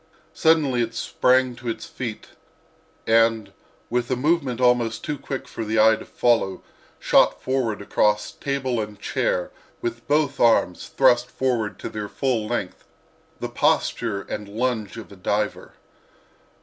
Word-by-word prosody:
Suddenly 150 -6 +3
it 115 0 -2
sprang 125 +1 +2
to 120 -1 -5
its 110 -1 -4
feet 115 -4 -6 0.8
and 115 -3 +3 0.4
with 120 0 0
a 130 - +1
movement 140 -2 0
almost 120 -2 +2
too 150 - -2
quick 135 -1 -6
for 115 - -5
the 110 0 0
eye 110 +1 +6
to - - -10
follow 115 -6 +1 0.3
shot - - +3
forward 120 -6 -1
across 105 0 +1
table 130 -4 -2
and 105 -1 -7
chair, - - -1 0.3
with 355 -1 -5
both 145 -1 +1
arms 115 -6 +3
thrust 125 -2 +3
forth 120 -5 -1
to - - -6
their 105 -1 -5
full 120 -5 -1
length—the - - -7
posture 100 -3 0
and 105 -1 -6
lunge 110 -1 -2
of 115 - -9
a - - -11
diver. 105 +2 -2
120 Hz, 140 wpm, -23 LUFS, 110-130 Hz, 0.8 s, eye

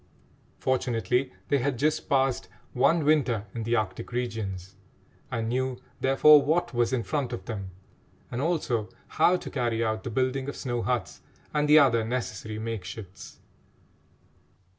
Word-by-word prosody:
Fortunately 125 0 0 0.2
they 140 - +3
had 130 0 -1
just 150 +4 0
passed 135 -2 +1 0.3
one 145 +5 +3
winter 125 -8 +2
in 115 - -4
the 115 +2 0
Arctic 105 -2 -2
regions 110 -7 -4 0.6
and 115 -3 -2
knew, 130 +1 -1 0.2
therefore, 145 +3 +6
what 170 +3 0
was 120 0 +1
in 125 -3 0
front 140 -2 -2
of 95 - -6
them, 100 -5 -5 0.6
and 125 +1 -2
also 140 -9 0 0.2
how 180 - +4
to - - -8
carry 120 -3 0
out 110 0 -2
the - - -4
building 130 +3 -1
of - - -6
snow 120 -2 -2
huts 125 0 -2 0.3
and 150 0 +1
the 150 - +8
other 120 -6 +5
necessary 110 -2 -4
makeshifts. 105 -3 -7
125 Hz, 145 wpm, -27 LUFS, 110-135 Hz, 0.6 s, the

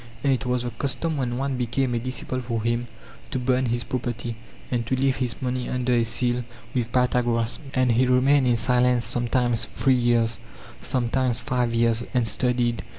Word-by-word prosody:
And 140 -1 +3
it 130 0 -2
was 125 -1 0
the 120 - -3
custom 150 +4 -1
when 125 -2 -1
one 135 0 -1
became 125 +1 0
a 120 - 0
disciple 130 +1 -3
for 115 -3 -3
him 120 +1 0 0.4
to - - -2
burn 130 0 +1
his 120 +1 -1
property 120 -2 -3 0.4
and 120 -2 0
to 130 - +1
leave 135 0 +1
his 125 -5 -2
money 125 0 -2
under 125 0 0
a 120 -1 +3
seal 120 +2 0 0.3
with 120 -2 -1
Pythagoras, 120 -2 +1 0.2
and 130 -2 +3
he 125 +3 +3
remained 130 +2 +4
in 120 - +4
silence 125 0 +3
sometimes 120 -1 +1
three 135 - +3
years, 120 -2 +2 0.4
sometimes 125 0 0
five 125 -2 0
years, 115 0 +2
and 120 -2 +2
studied. 120 -1 0
125 Hz, 180 wpm, -24 LUFS, 120-130 Hz, 0.4 s, remained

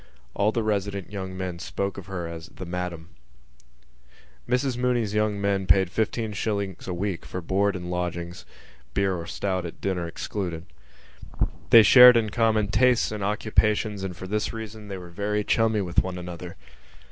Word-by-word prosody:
All 100 +2 +2
the 115 0 -1
resident 100 -2 -2
young 95 -2 -5
men 90 -2 -4
spoke 100 +3 -3
of 95 -1 -9
her 90 -3 -4
as 85 0 -8
The 95 - -9
Madam. 90 -1 -5 1.4
Mrs 125 0 +1
Mooney's 120 -4 0
young 105 -1 +1
men 100 -1 0
paid 95 -3 +4
fifteen 110 +1 -1
shillings 100 -3 -3
a 90 - -2
week 95 -1 -3
for 90 - -5
board 100 +3 +1
and 90 -1 -5
lodgings 85 -1 -4 0.5
(beer 100 -1 +2
or 85 -1 -6
stout 95 -3 -2
at 85 - -8
dinner 90 -3 -2
excluded). 85 -1 -4 1.0
They 115 -2 +9
shared 125 +1 +9
in 110 -2 0
common 110 -2 +2
tastes 120 +3 +3
and 105 -2 -4
occupations 105 0 +1
and 90 -3 -5
for 95 - -7
this 105 +3 -1
reason 110 -2 -8
they 100 -1 -5
were 90 -1 -10
very 105 +3 -1
chummy 110 0 +2
with 90 -2 +2
one 95 -1 -5
another. 90 0 -7
100 Hz, 170 wpm, -25 LUFS, 90-105 Hz, 1.4 s, They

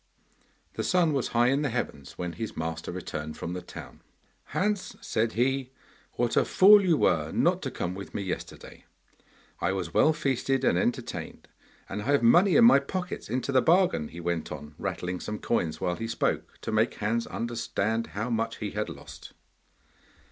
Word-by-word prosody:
The - - -3
sun 175 -4 +2
was 135 -3 0
high 120 +1 +3
in 135 +2 +2
the 145 - 0
heavens 110 - -4
when 90 -1 -4
his 110 +7 -6
master 80 +1 -4
returned 80 -4 -5
from 85 - -4
the 90 - -4
town. 90 - -11 0.4
'Hans,' 205 0 -1
said 110 0 -1
he, 130 +2 0 0.4
'what 120 -1 0
a - - +5
fool 205 +2 +7
you 170 -4 +3
were 80 - +2
not - - +2
to - - -3
come 90 - -3
with 100 +1 -9
me 100 - -2
yesterday! 95 - -7 0.7
I 95 - 0
was 90 -4 -4
well 155 - +5
feasted 135 -2 0
and 85 - +3
entertained, 120 +7 -3 0.4
and 105 - -4
I - - -7
have 140 -2 +2
money 175 - +6
in 230 - +7
my 235 - +8
pocket 180 - -5
into 130 +4 -1
the 130 -1 +4
bargain,' 170 - +3
he 85 - -10
went 85 -2 -2
on, 75 0 -8
rattling 90 0 -3
some 105 - -4
coins 80 -10 -1
while 90 -1 -1
he 115 - -4
spoke, 115 - -2
to - - -4
make 110 +2 +2
Hans 115 +3 -1
understand 115 -1 -2
how 115 +4 -2
much 115 0 -1
he 105 -2 -4
had 105 -2 -3
lost. 70 -3 -11
115 Hz, 185 wpm, -28 LUFS, 90-135 Hz, 0.7 s, my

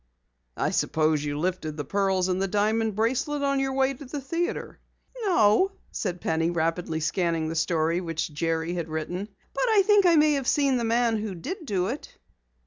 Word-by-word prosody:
"I - - 0
suppose 155 -1 +1
you 145 -1 -3
lifted 160 -2 -2
the 145 - -4
pearls 190 +2 +1
and 185 0 0
the 195 - +1
diamond 215 +2 +1
bracelet 260 +7 0
on 275 -1 +1
your 270 0 -1
way 265 0 +2
to 270 - -11
the 280 +2 -5
theatre." 335 +6 -3 0.5
"No," 365 - +4 0.2
said 180 -4 -3
Penny, 165 +1 0
rapidly 165 -1 -1
scanning 165 -1 0
the 165 - -4
story 165 +1 +1
which 165 -2 -3
Jerry 165 +2 -1
had 170 -2 -4
written, 175 +6 -4 0.2
"but - - 0
I 420 -3 +5
think 410 -2 +5
I 340 - +5
may 305 -1 +5
have 275 -3 -2
seen 275 -3 +3
the 240 - -1
man 230 0 +2
who 210 -3 -4
did 320 - -6
do 185 -5 0
it." 250 +9 -6
195 Hz, 190 wpm, -26 LUFS, 165-270 Hz, 0.5 s, I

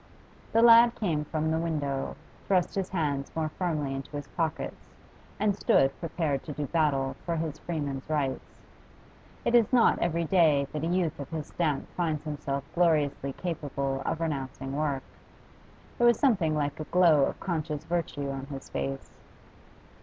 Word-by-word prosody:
The 230 - +4
lad 235 0 +8
came 160 -8 -1
from 155 +1 -1
the 160 - +1
window, 145 -5 -2 0.3
thrust 185 -3 +2
his 195 -1 -2
hands 145 -6 -1
more 160 -1 0
firmly 155 -5 -2
into 135 +2 -6
his 145 -1 -5
pockets 160 -2 -3 0.5
and 210 -2 +2
stood 135 -8 +3
prepared 160 -5 -1
to 150 - -5
do 145 +1 -3
battle 135 -4 +1
for 170 - -1
his 160 -2 -3
freeman's 145 -5 -4
rights 140 -4 -2 0.8
It 235 - +1
is 235 -3 +5
not 245 -3 +4
every 170 0 0
day 155 -5 +4
that 150 0 -3
a - - 0
youth 175 -4 0
of 140 - -6
his 160 -3 -4
stamp 155 -5 -1
finds 160 -4 -1
himself 145 -3 -3
gloriously 150 -5 +2
capable 140 -5 -3
of 165 - -2
renouncing 135 -3 -3
work. 145 -3 -1 1.0
There 240 - +5
was 235 -2 +5
something 190 - +2
like 145 -1 -1
a 155 - -4
glow 165 -6 +5
of - - -4
conscious 155 -4 -3
virtue 160 -4 -2
on 135 0 -5
his 135 -2 -8
face. 70 0 -5
155 Hz, 160 wpm, -28 LUFS, 140-170 Hz, 1.0 s, lad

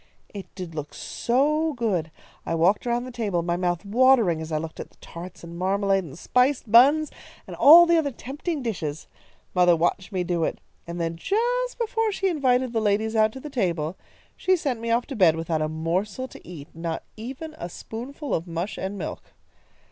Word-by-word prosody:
"It 200 -2 -7
did 180 -3 -7
look 150 -2 -6
so 300 +6 0
good! 205 - -1 0.3
I - - -2
walked 185 +8 +2
around 240 0 0
the 255 - -7
table, 205 -8 -1
my 170 0 0
mouth 175 +1 -1
watering 225 -6 +4
as 160 0 -7
I 155 - +1
looked 160 +1 -6
at - - -7
the - - -27
tarts 175 +1 -10
and 170 0 -9
marmalade 195 +1 +1
and 150 -3 -10
spiced 250 +3 +1
buns, 285 +7 +6 0.3
and - - -8
all 335 +4 +9
the 340 -1 +4
other 295 -3 0
tempting 280 +4 -5
dishes. 160 -9 -4 0.5
Mother 180 -1 +5
watched 175 +4 -1
me 185 -2 -1
do 175 -1 -1
it, - - -1 0.3
and 170 +1 -5
then, 165 0 -2
just - - 0
before 450 -2 0
she 390 -1 0
invited 260 -6 +1
the 225 - +1
ladies 215 +2 +1
out 215 0 +4
to 265 - -8
the 295 +2 -8
table, 175 - -1 0.4
she 375 - +2
sent 275 -9 -2
me 230 0 -4
off 235 +1 +2
to 275 - -7
bed 180 -7 +5
without 165 -1 -2
a 155 - 0
morsel 180 +10 -2
to - - -14
eat, 155 -5 -9
not 165 0 -4
even 265 +8 -7
a 170 - -5
spoonful 265 - -6
of 165 +2 -1
mush 170 +4 -4
and 195 +2 -4
milk. - - -7
210 Hz, 200 wpm, -25 LUFS, 170-265 Hz, 0.5 s, all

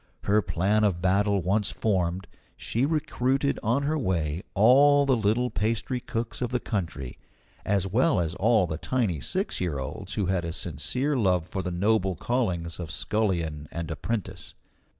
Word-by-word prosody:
Her 105 +2 +3
plan 95 +4 +1
of 95 -5 +2
battle 100 +1 +2
once 100 +3 +1
formed, 95 -3 -1 0.3
she 125 +5 -1
recruited 140 -3 0
on 120 +6 +1
her 155 +2 0
way 85 - -1
all 140 +7 +6
the 135 -2 +3
little 115 +3 +1
pastry 115 +4 -1
cooks 115 0 -4
of 125 - 0
the 125 - 0
country, 85 - -4 0.4
as 100 -1 +1
well 120 - +2
as 85 -1 -1
all 105 +1 +3
the 80 -1 -4
tiny 110 - 0
six 65 - -2
year 85 -6 -1
olds 65 - -5
who 100 - 0
had 95 -1 0
a 85 -1 -3
sincere 125 - -2
love 90 -8 +1
for 95 - -3
the 90 - -3
noble 95 +1 +1
callings 90 -7 -2
of 85 -3 -5
scullion 85 -3 -1
and 85 -1 -4
apprentice. 95 -1 -4
100 Hz, 165 wpm, -27 LUFS, 85-120 Hz, 0.4 s, all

